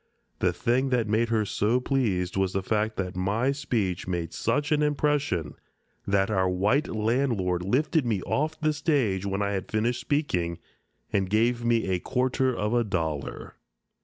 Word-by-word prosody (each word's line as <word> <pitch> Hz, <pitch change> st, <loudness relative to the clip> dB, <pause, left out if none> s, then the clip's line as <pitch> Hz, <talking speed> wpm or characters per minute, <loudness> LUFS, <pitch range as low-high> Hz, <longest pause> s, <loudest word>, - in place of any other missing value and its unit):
The -, -, +2 dB
thing 130 Hz, +3 st, 0 dB
that 120 Hz, -4 st, +1 dB
made 110 Hz, +2 st, +1 dB
her 110 Hz, -2 st, +1 dB
so 110 Hz, +5 st, +1 dB
pleased 105 Hz, -10 st, 0 dB
was 95 Hz, -1 st, 0 dB
the 95 Hz, -, -1 dB
fact 110 Hz, +2 st, 0 dB
that 90 Hz, -2 st, -3 dB
my 105 Hz, +8 st, +1 dB
speech 110 Hz, -11 st, -2 dB
made 85 Hz, -2 st, -3 dB
such 145 Hz, +2 st, 0 dB
an 150 Hz, -1 st, +3 dB
impression 145 Hz, -, 0 dB, 0.5 s
that 100 Hz, +1 st, +2 dB
our 95 Hz, -2 st, +2 dB
white 105 Hz, -, +1 dB
landlord 110 Hz, -5 st, 0 dB
lifted 140 Hz, -, +1 dB
me 110 Hz, -6 st, -1 dB
off 155 Hz, +2 st, -1 dB
the 155 Hz, -1 st, +1 dB
stage 130 Hz, -, 0 dB
when 100 Hz, +1 st, -1 dB
I 100 Hz, -, 0 dB
had 95 Hz, -2 st, -3 dB
finished 115 Hz, +3 st, 0 dB
speaking 90 Hz, -, -1 dB, 0.6 s
and 95 Hz, -2 st, +1 dB
gave 115 Hz, +3 st, +2 dB
me 120 Hz, -2 st, +2 dB
a 95 Hz, -1 st, 0 dB
quarter 130 Hz, +3 st, 0 dB
of 105 Hz, -2 st, -1 dB
a 120 Hz, -1 st, +3 dB
dollar. 80 Hz, -8 st, -3 dB
110 Hz, 165 wpm, -27 LUFS, 95-130 Hz, 0.6 s, an